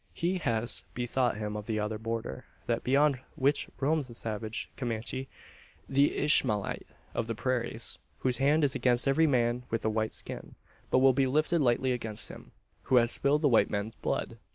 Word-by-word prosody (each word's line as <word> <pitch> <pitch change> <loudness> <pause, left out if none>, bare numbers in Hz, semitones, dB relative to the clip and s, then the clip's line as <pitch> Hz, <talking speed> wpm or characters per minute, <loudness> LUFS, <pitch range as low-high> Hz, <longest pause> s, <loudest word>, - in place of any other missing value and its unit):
He 180 +2 0
has 115 -6 -1
bethought 120 -1 0
him 105 -1 -3
of 105 -1 -6
the 110 -2 -1
other 105 +1 -2
border 115 -11 -4 0.2
that - - -1
beyond 140 +1 +3 0.2
which 140 +2 +1
roams 145 0 +1
the 120 - -10
savage 110 0 -4
Comanche 120 +2 -3 0.6
the 140 +1 +3
Ishmaelite 120 -9 +2 0.3
of 115 - -2
the 115 - -2
prairies 120 -2 -2 0.2
whose 125 -2 +1
hand 145 +4 +3
is 140 -2 +3
against 125 -2 +2
every 160 +4 +4
man 120 -3 +2
with 115 -1 -2
a 110 - +2
white 110 0 -1
skin; - - -7 0.3
but - - +3
will 135 - +7
be 135 +1 +2
lifted 155 +5 +2
lightly 130 0 +2
against 110 -4 -2
him, - - -11 0.3
who 130 - +2
has 120 -1 +5
spilled 145 +3 +2
the - - +6
white 120 -5 +4
man's 100 +2 -2
blood! - - -2
125 Hz, 180 wpm, -30 LUFS, 110-140 Hz, 0.6 s, will